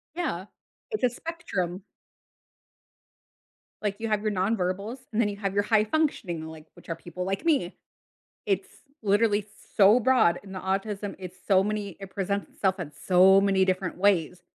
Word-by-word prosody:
Yeah. 205 - -2 0.4
It's 430 - -2
a 245 - +4
spectrum. 200 - -4 2.0
Like 200 -1 -1
you 225 0 -3
have 210 -1 0
your 215 -1 0
nonverbals, 200 +4 -1
and 220 - +1
then 210 - +3
you 200 - -4
have 200 -1 -3
your 205 - +3
high 215 0 +3
functioning, 210 - -1
like 160 -1 -10
which - - -17
are 165 - -3
people 180 +2 -6
like 195 - -3
me. 275 - +1 0.7
It's 195 -2 0 0.4
literally 205 0 +2 0.3
so 210 +4 +7
broad 240 -8 +3
in 195 -1 -10
the 185 - -4
autism. 195 +1 -2
It's 185 0 -8
so 190 -1 +5
many 205 -3 -3
it 195 -1 -8
presents 200 +1 -2
itself 190 -1 -1
in 150 -4 -5
so 190 +1 +6
many 195 -1 +3
different 185 -1 -1
ways, 180 -3 +2
195 Hz, 165 wpm, -27 LUFS, 185-215 Hz, 2.0 s, so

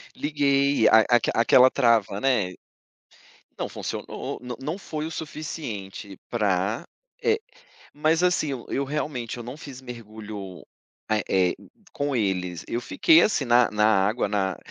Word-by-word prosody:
Liguei, 140 -4 +2
a 110 - +8
aque 120 -1 +3
aquela 125 +2 +6
trava, 115 -6 +2
né. 105 -9 +1 1.1
Não - - -2
funcionou, - - -5
não 125 -1 -6
não 155 +8 -4
foi 155 -5 -5
o - - -5
suficiente 115 - -6
pra, 105 -1 0 0.4
eh, 450 -1 +2 0.6
mas 155 +3 +2
assim, 180 -4 +2
eu 125 -3 -6
eu 140 - -1
realmente, 135 -5 -3
eu 120 - -7
não 125 +4 -7
fiz 135 -4 -10
mergulho, 110 -6 -8 0.5
eh 110 -1 +1
eh, 90 -2 +2 0.4
com 145 -1 -2
eles. 90 -5 -1
Eu 120 - -2
fiquei, 325 - +5
assim, 150 -10 +1
na 120 -1 +4
na 105 0 +2 0.2
água, 110 +1 0
na 95 -3 -1
120 Hz, 145 wpm, -25 LUFS, 105-145 Hz, 1.1 s, a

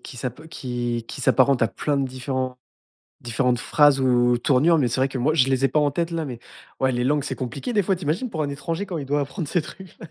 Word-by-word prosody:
qui 125 - -10
s'ap 130 +6 -6
qui 120 -5 -3
qui - - -6
s'apparentent 130 0 +3
à 115 - +3
plein 145 -2 -2
de 135 -1 +1
différents 130 0 -4 0.6
différentes 125 +1 0
phrases 145 +1 +4
ou 120 -2 +3
tournures, 145 +7 +3
mais 135 -5 +2
c'est 125 +3 -2
vrai 135 - +3
que 135 - -5
moi, 135 +6 +1
je 135 -5 +3
les 135 0 +2
ai - - +4
pas 150 - +1
en 145 -1 +3
tête 170 +4 -2
là, 165 -1 -2
mais 125 -5 -6 0.4
ouais, 130 0 +2
les 120 -1 -1
langues, 145 +1 +1
c'est - - -3
compliqué 135 - -5
des 205 - +3
fois, 190 +1 +1
tu 180 - -9
imagines 170 - -1
pour 160 -5 -2
un 145 - -2
étranger, 165 +7 -3
quand 175 -5 -4
il 135 - -7
doit 145 +1 +1
apprendre 140 +3 -4
ces 175 +3 +1
trucs. 190 +3 -12
135 Hz, 260 wpm, -23 LUFS, 125-155 Hz, 0.6 s, phrases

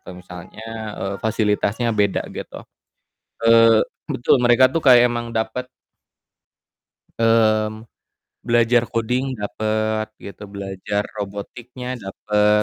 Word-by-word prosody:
atau 90 - -11
misalnya 90 +4 -11 0.6
fasilitasnya 110 +1 0
beda 100 -2 0
gitu. - - -7 0.9
Eee, 115 -1 +6 0.2
betul 120 - +2
mereka 120 +1 +5
tuh 165 - 0
kayak 125 -3 +7
emang 120 0 -4
dapet. 115 +3 -3 1.5
Mmm, 110 -1 +2 0.6
belajar 120 0 +3
coding 125 +3 -1 0.2
dapet 110 +1 -1 0.2
gitu, 100 +1 -10
belajar 100 +1 -3 0.2
robotiknya 115 +5 -7 0.2
dapet 105 +2 +1
110 Hz, 95 wpm, -21 LUFS, 105-120 Hz, 1.5 s, kayak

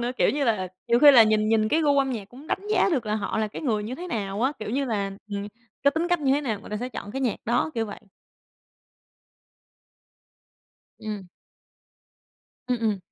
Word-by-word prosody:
nữa, 240 +1 -1
kiểu - - +3
như 285 0 0
là, 215 -6 0 0.2
nhiều 235 0 +4
khi 295 +1 +9
là 245 -5 +9
nhìn 215 0 +2
nhìn 220 -1 +3
cái 315 +8 +2
gu 285 -1 +3
âm 270 -1 +2
nhạc 215 -6 -5
cũng 265 +6 -13
đánh 395 - -3
giá 430 - +3
được 250 -8 0
là 210 - 0
họ 215 0 -2
là 215 - 0
cái 210 - -8
người 220 -7 0
như 225 +4 -5
thế 350 +6 -7
nào 200 - -3
á. 265 +3 +2
Kiểu 215 - -5
như 275 +3 0
là 205 -5 -1 0.2
ừm, 200 0 -3 0.4
cái 280 - +5
tính 320 +4 -1
cách 350 -3 +1
như 270 -2 +2
thế 285 - +2
nào 225 -8 -3
người 210 - -12
ta 210 - -2
sẽ 245 +4 -4
chọn 205 -3 -7
cái 270 - -3
nhạc 245 -6 0
đó, 240 +7 +1
kiểu 225 -1 -1
vậy. 205 - -8 3.0
Ừm. 210 -3 -6 1.4
Ừm, 250 -1 0
ừm. 215 -3 +1
235 Hz, 220 wpm, -25 LUFS, 215-275 Hz, 3.0 s, khi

